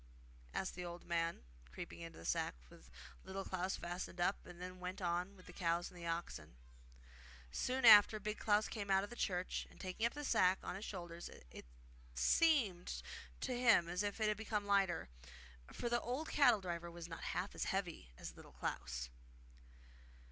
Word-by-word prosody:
asked 190 - -2
the 180 - -5
old 175 0 -7
man, 170 - -1 0.3
creeping 65 - -7
into 165 0 -8
the 85 - -10
sack, - - 0
which - - -15 0.4
Little 195 +1 -4
Klaus 185 +1 -1
fastened 175 +1 -5
up 175 +3 +1
and 175 -1 -11
then 180 0 -7
went 180 +1 -4
on 180 +2 -1
with 185 - -15
the 180 - -11
cows 170 -1 0
and 175 -1 -10
oxen. 165 - -4 1.0
Soon 255 - 0
after 215 -1 +10
Big 210 +1 -3
Klaus 210 0 +3
came 205 -3 -4
out 195 0 +4
of 205 - -6
the - - -6
church, 185 -5 -1
and - - -18
taking 185 +4 -4
up 235 - -7
the 295 - -4
sack 185 -8 +4
on - - -3
his 195 +4 -5
shoulders 175 -3 -6 0.2
it - - -10 0.5
seemed 215 - +3 0.4
to 255 - -1
him 235 -8 +5
as 175 +2 -1
if 205 +1 -2
it 215 - +2
had 210 -1 +1
become 210 -1 -2
lighter; 195 - +2 0.6
for 240 - -3
the 240 0 +2
old 260 +7 -3
cattle 245 -8 +5
driver 170 -2 -4
was 170 0 -8
not 165 - -7
half 185 +3 -2
as - - -2
heavy 175 - -2
as - - -7
Little - - -13
Klaus. 60 0 -3
185 Hz, 185 wpm, -38 LUFS, 175-210 Hz, 1.0 s, after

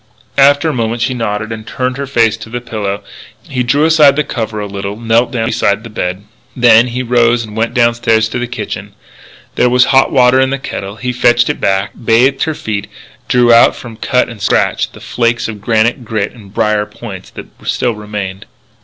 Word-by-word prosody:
After 140 +3 +5
a 155 - 0
moment 115 -1 -1
she 130 - 0
nodded 110 -2 -3
and 110 -1 -6
turned 125 0 -2
her 140 0 -4
face 115 -4 +1
on - - -14
the 120 - -3
pillow. 105 -4 -4 0.4
He 125 -2 -2
drew 140 +5 +2
aside 155 -4 +5
the 150 - +1
cover 110 -6 -4
a 105 - -3
little, 100 +1 -6
knelt 115 +1 +2
down 115 -3 -1
beside 110 -2 0
the 115 - -10
bed. 95 -1 -3 0.3
Then 120 -1 +5
he 125 +1 -3
rose 120 -1 +2
and 105 -1 -11
went 115 +2 -1
downstairs 115 -2 +2
to 125 - -3
the 120 - -3
kitchen. 120 - -6 0.6
There 125 - +2
was 125 0 +4
hot 135 0 +4
water 130 -1 +4
in 130 - +2
the 140 - -1
kettle. 100 -6 -6
He 125 +2 -3
fetched 120 0 +3
it - - -9
back, 95 +1 0
bathed 125 +5 +3
her 160 - -2
feet, 105 -5 -4 0.4
drew 120 -1 +4
out 115 - +6
from 115 -2 -10
cut 125 +3 0
and 115 -4 -10
scratch - - +1
the - - -14
flakes 120 0 -1
of 105 -2 -7
granite 115 +3 +1
grit 105 -3 -2
and 105 -5 -15
brier 105 -1 0
points 105 -3 -9
that - - -8 0.2
still 120 - 0
remained 105 -3 -6
there. - - -14
115 Hz, 205 wpm, -14 LUFS, 105-125 Hz, 0.6 s, out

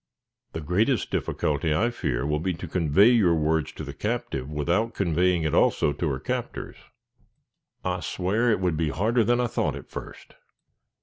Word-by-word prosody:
"The 80 - -4
greatest 105 - +1
difficulty, 75 +1 0
I 115 +10 +1
fear, 60 - -2
will 75 +1 0
be 90 +2 -1
to - - -7
convey 90 +5 +4
your 105 -9 +4
words 80 -1 0
to - - -7
the 70 - -7
captive, 105 - -3
without 85 +10 0
conveying 90 -1 +1
it 80 - -1
also 75 - +3
to 80 +2 -2
her 65 -2 -2
captors." - - -4 1.1
"I 90 0 -1
swow, 95 +8 0
it 110 - +2
would 90 -4 0
be 80 -1 0
harder 110 +9 +1
than 120 +3 +2
I 125 - +2
thought 120 - -1
at - - -10
first." - - -9
90 Hz, 175 wpm, -26 LUFS, 75-110 Hz, 1.1 s, convey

